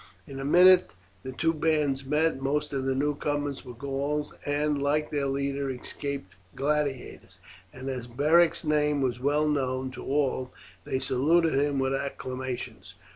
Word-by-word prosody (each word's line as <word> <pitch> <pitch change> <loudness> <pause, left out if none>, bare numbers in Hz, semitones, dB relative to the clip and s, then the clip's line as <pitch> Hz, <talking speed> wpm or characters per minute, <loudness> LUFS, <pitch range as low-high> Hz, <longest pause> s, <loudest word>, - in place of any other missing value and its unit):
In 135 -4 -8
a - - -4
minute 180 +4 +6 0.3
the 130 - -6
two 165 +5 0
bands 150 -4 +1
met. 150 +1 +1
Most 150 +2 -1
of 135 -1 -2
the 135 0 0
newcomers 145 0 -1
were 125 -3 -10
Gauls, 140 +3 -3
and, 145 0 0
like 150 +2 0
their 145 -2 0
leader, 140 0 -1
escaped 130 -4 -5 0.2
gladiators, 140 -2 -2 0.3
and 130 +1 -9
as 125 -3 -4
Beric's 155 +7 +3
name 150 -1 +2
was 125 -1 -1
well 145 +3 +1
known 130 -3 -1
to 130 - -9
all 135 -2 0 0.3
they - - -1
saluted 155 +6 +2
him 140 +1 +1
with 135 0 +1
acclamations. 130 -7 -5
140 Hz, 150 wpm, -27 LUFS, 130-150 Hz, 0.3 s, minute